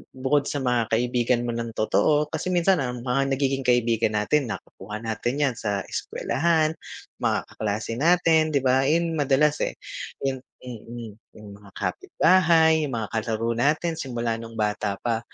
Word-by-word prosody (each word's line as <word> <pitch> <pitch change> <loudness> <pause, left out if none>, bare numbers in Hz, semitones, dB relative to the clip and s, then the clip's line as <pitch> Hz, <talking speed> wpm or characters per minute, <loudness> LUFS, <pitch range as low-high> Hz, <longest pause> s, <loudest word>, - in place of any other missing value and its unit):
bukod 135 +2 +1
sa 140 -2 -2
mga 120 -3 +1
kaibigan 120 0 +1
mo 120 - -2
ng 115 -1 -4
totoo 150 +7 +2
kasi 160 +3 -3
minsan 180 +1 +3
ang 125 -2 -3
mga 135 +2 +1
nagiging 135 -1 -1
kaibigan 115 -3 +2
natin, 125 +6 +1
nakakuha 105 +3 -8
natin 120 +5 -2
'yan 130 -4 +1
sa 100 -3 -2
eskuwelahan, 160 +1 0 0.5
mga - - 0
kaklase 105 +2 -3
natin 165 -1 +4
'di 135 - +2
ba 130 +1 +3
yun 165 +2 +2
madalas, 145 +2 +2
eh, - - -1 0.5
'yun. 135 -1 -1 0.2
Mhm, 120 -3 -7
mhm. 120 -1 -7 0.3
'Yung 105 -1 -12
mga 100 -1 -16
kapitbahay, 160 -3 +3
'yung 130 - -4
mga 110 -4 -3
kalaro 115 +1 -1
natin 155 +4 +1
simula 120 -4 -2
nung 115 0 -9
bata 105 -1 -1
pa. 115 -2 0
125 Hz, 160 wpm, -25 LUFS, 115-150 Hz, 0.5 s, natin